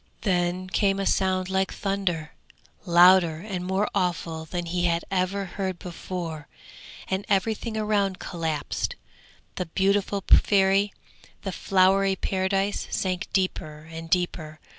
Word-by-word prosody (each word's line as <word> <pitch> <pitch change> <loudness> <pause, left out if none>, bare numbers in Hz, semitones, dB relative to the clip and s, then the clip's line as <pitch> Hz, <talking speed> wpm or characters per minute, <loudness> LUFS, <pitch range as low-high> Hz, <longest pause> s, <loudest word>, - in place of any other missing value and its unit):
Then 180 -2 0
came 195 +1 +1
a 195 - -1
sound 185 -1 +1
like 190 0 0
thunder, 190 -6 -2 0.6
louder 175 -1 +6
and 185 0 -5
more 190 +3 0
awful 165 -4 -1
than 175 +2 -3
any - - -6
he 175 0 0
had 170 -1 +1
ever 195 +1 0
heard 185 0 -4
before, 170 -3 -6 0.6
and 190 +1 -1
everything 220 +3 0
around 205 -3 +1
collapsed. 160 -4 -3 0.6
The 180 - -2
beautiful 195 +2 +1
Fairy, 195 0 +4 0.5
the 195 - -3
flowery 195 +1 +3
Paradise 195 +1 -1
sank 185 -2 -2
deeper 155 -5 -2
and 165 0 -7
deeper. 160 -4 -1
185 Hz, 125 wpm, -26 LUFS, 175-195 Hz, 0.6 s, louder